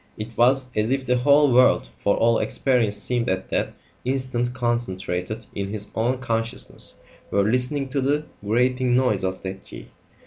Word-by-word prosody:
It 110 +2 -7
was 125 +1 +2
as 105 +1 +1
if 135 0 0
the 125 0 +2
whole 140 +1 +4
world 125 +1 +4
for 100 - +2
all 115 0 +3
experience 120 -6 +1
seemed 120 +3 -1
at 95 0 -2
that - - -1 0.3
instant 130 -2 -1
concentrated 110 -4 -2
in 100 -1 -3
his 105 0 -4
own 120 +4 0
consciousness 115 -3 -3 0.3
were 100 - +2
listening 125 +6 +1
to 135 +1 -1
the 145 +3 0 0.2
grating 125 +3 +2
noise 125 -7 +2
of 95 0 -3
that 95 0 -6
key. - - -10
120 Hz, 165 wpm, -23 LUFS, 105-130 Hz, 0.3 s, whole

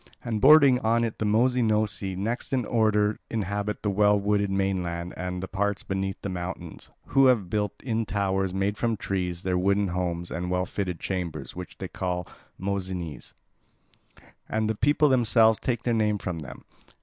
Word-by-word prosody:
And 110 -3 -2
bordering 140 -2 +7
on 115 0 +2
it 115 -2 -3
the 110 - 0
Mossynoeci 110 -4 +2
next 115 +8 -3
in 125 -3 +1
order 105 -2 +2
inhabit 105 -1 -3
the 105 - +1
well 105 +1 +4
wooded 100 0 +1
mainland 90 -3 -1
and 90 0 -4
the - - -4
parts 105 +1 -1
beneath 95 0 -3
the - - -2
mountains, 90 -2 -6 0.2
who 135 0 +5
have 105 -9 +2
built 105 -1 -2
in 115 -3 -1
towers 95 -2 0
made 95 +2 -1
from 115 -2 0
trees 90 -2 -3
their 90 -1 0
wooden 100 +1 +2
homes 85 -1 -3
and 90 +1 -3
well 90 0 0
fitted 90 -2 -3
chambers, 85 -7 -4
which 90 0 -8
they 95 - -5
call 90 -1 -3 0.3
Mossynes, 95 -5 -4 1.2
and 110 0 0
the 110 - +1
people 145 +7 +3
themselves 115 -4 +4
take 120 -3 -2
their 120 - +1
name 105 -2 +2
from 90 -3 -4
them. 65 -5 -10
100 Hz, 170 wpm, -26 LUFS, 90-110 Hz, 1.2 s, bordering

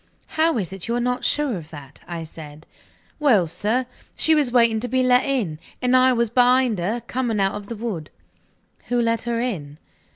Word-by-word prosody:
"How 320 -3 +1
is 190 -3 -2
it 195 0 -7
you 235 - -1
are - - 0
not 250 +1 -1
sure 295 -6 +1
of 160 -2 -10
that?" 145 -3 -11
I 170 -1 -5
said. 155 -1 -11 0.5
"Well, 240 - +4
sir, 215 +10 -1 0.3
she 320 - +3
was 295 -5 +2
waiting 235 -2 +3
to 245 - -3
be 255 +1 +1
let 250 0 +4
in; 220 - -1 0.2
and 250 0 +2
I 255 0 +5
was 235 -3 0
behind 250 -3 +3
her, 210 +8 -2
coming 240 -4 -2
out 195 0 +1
of 205 -1 -7
the 230 - -5
wood." 205 -9 -5 0.8
"Who 245 0 +1
let 230 -1 +1
her 230 -1 0
in?" 160 -12 -4
235 Hz, 200 wpm, -22 LUFS, 185-250 Hz, 0.8 s, I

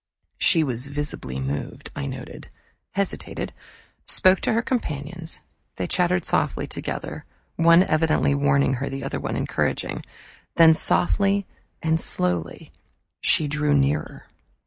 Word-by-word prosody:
She 165 -4 +4
was 130 -2 -2
visibly 140 - -4
moved, 70 +2 -4
I 70 - -3
noted, - - -8 0.4
hesitated, 200 0 -3 0.5
spoke 185 0 +5
to - - +1
her 230 +2 +1
companions. 165 - -3 0.3
They 90 - -2
chattered 180 - +1
softly - - +1
together, - - -5 0.3
one 170 +2 +6
evidently 155 -4 +2
warning 140 -1 +2
her, 140 - -2
the 135 0 -5
other - - -3
encouraging. - - -1 0.5
Then, 165 -1 +8
softly 195 +4 +2 0.4
and 160 0 +2
slowly, 85 -2 -2 0.5
she 155 - +3
drew 150 0 +1
nearer. 140 +2 0
150 Hz, 120 wpm, -24 LUFS, 140-175 Hz, 0.5 s, Then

